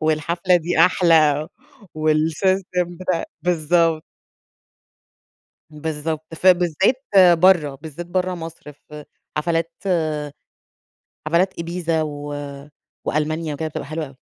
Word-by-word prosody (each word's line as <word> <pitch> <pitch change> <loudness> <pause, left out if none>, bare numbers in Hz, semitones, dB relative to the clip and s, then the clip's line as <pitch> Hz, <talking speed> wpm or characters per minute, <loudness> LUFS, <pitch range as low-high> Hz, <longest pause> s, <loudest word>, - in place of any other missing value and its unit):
والحفلة 170 +4 +2
دي 175 0 -2
أحلى 160 -3 +4 0.5
والسيستم 170 +3 0
بتا 185 -2 -1 0.2
بالضب 165 -1 +2 1.7
بالضبط. 155 +1 -5
فبالذات 185 - +3 0.3
برّه 165 -6 +4
بالذات 160 +4 -8
برّه 185 +1 -1
مصر 165 -2 -9
في 150 +1 -13 0.3
حفلات 165 +1 0
آآ 155 -5 -1 1.0
حفلات 175 +4 +2
إيبيزا 170 -1 -2
و 145 -1 -5 0.7
وألمانيا 155 +1 -1
وكده 160 +2 -3
بتبقى - - -6
حلوة 155 +1 -4
أوي. 135 -1 -15
160 Hz, 95 wpm, -21 LUFS, 155-175 Hz, 1.7 s, أحلى